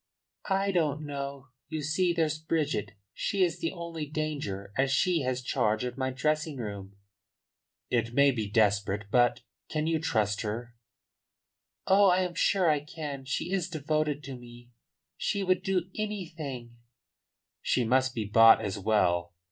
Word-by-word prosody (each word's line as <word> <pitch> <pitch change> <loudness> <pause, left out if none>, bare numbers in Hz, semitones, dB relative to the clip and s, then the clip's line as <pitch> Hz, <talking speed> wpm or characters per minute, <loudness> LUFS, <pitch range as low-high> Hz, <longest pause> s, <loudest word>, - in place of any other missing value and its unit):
"I 195 +1 +2
don't 155 -4 0
know. 140 -2 -6 0.2
You 155 -1 -3
see, 175 +5 +1
there's 160 -2 0
Bridget. 145 -11 -1 0.2
She 195 -2 0
is 175 -2 0
the 165 - -1
only 165 -3 -6
danger, 140 -11 -4
as 130 0 +2
she 170 +3 +2
has 130 -1 -2
charge 110 -3 +1
of 125 -1 -3
my 130 -1 -1
dressing 150 +3 -1
room." 100 -4 -6 1.0
"It 115 -1 +1
may 140 +3 +5
be 110 -5 -3
desperate, 100 -1 +1
but 120 0 +3 0.3
Can 155 -1 -1
you 160 0 +1
trust 105 -8 0
her?" 120 +2 -4 1.1
"Oh, 195 +1 +6
I 180 +1 +3
am 180 -1 -2
sure 185 +1 +2
I 150 -2 +3
can. 145 -2 -7
She 140 +6 -2
is 185 -3 0
devoted 155 -2 -1
to 135 -1 -6
me; 120 0 -13 0.5
she 200 - -1
would 185 -1 +2
do 185 -1 -1
anything 160 - -5 0.4
" - - -63
"She 125 - +1
must 130 +2 +2
be 110 -3 -2
bought 115 +2 +7
as 100 -2 -3
well. 90 -4 +1
140 Hz, 155 wpm, -29 LUFS, 115-165 Hz, 1.1 s, bought